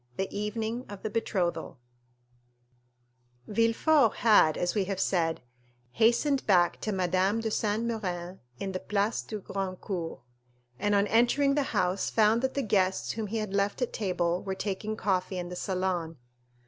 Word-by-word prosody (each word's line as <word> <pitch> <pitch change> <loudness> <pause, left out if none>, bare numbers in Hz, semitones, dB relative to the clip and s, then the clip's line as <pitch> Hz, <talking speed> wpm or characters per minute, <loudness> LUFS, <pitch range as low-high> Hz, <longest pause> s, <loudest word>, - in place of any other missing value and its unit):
The 190 - -3
Evening 220 +4 -3
of 205 -2 -9
the 215 - -3
Betrothal 190 - -1 1.7
Villefort 230 +8 +3
had, 205 -9 +5
as 175 - 0
we 205 -3 +1
have 195 0 -3
said, 165 -5 0 0.5
hastened 240 - +2
back 175 -4 +3
to 215 - -2
Madame 190 +2 +1
de 225 -1 -2
Saint 215 +2 0
Méran's 185 -6 -4 0.2
in 195 - -3
the 185 - -3
Place 205 +3 0
du 215 - -6
Grand 190 -1 -4
Cours, 175 -5 -5 0.6
and 205 0 +1
on 200 0 +4
entering 245 +6 +3
the 290 - +2 0.2
house 185 +2 +1
found 220 +1 +3
that 265 0 -1
the 280 - 0
guests 190 -4 +1
whom 220 -1 -4
he 225 +3 -3
had 215 -3 -3
left 200 0 0
at 250 - -2
table 180 -4 0
were 190 -1 -4
taking 210 +2 -3
coffee 185 -2 -1
in 175 -1 -4
the 180 - -6
salon. 180 -4 -2
200 Hz, 160 wpm, -29 LUFS, 185-225 Hz, 1.7 s, had